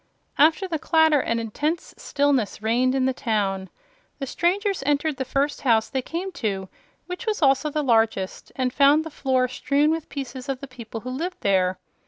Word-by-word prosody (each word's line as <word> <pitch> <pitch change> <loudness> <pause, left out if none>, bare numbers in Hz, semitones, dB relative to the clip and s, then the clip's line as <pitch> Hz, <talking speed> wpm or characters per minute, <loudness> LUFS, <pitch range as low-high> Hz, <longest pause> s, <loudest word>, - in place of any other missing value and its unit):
After 320 +6 +4
the 325 -4 -2
clatter 320 -1 +4
an 230 - -1
intense 290 +9 -3
stillness 280 -6 0
reigned 250 +4 +2
in 260 -1 +2
the 265 - +1
town. 200 -6 -1 0.5
The 275 - -4
strangers 375 - 0
entered 290 +1 0
the 265 - -2
first 280 +3 -1
house 225 -4 +2
they 265 - -1
came 350 +8 -4
to, 195 -3 -2 0.4
which 360 +6 -7
was 425 -6 0
also 275 +2 +3
the 300 0 -1
largest, 225 -6 +1
and 255 -1 -1
found 290 +2 +5
the 320 - -8
floor 260 -3 +1
strewn 280 +4 +1
with 325 -1 -3
pieces 260 -2 -6
of 270 -2 -2
the 275 - -7
people 235 -4 -8
who 255 - -6
lived 335 +8 -4
there. 185 -2 +2
270 Hz, 185 wpm, -24 LUFS, 235-305 Hz, 0.5 s, found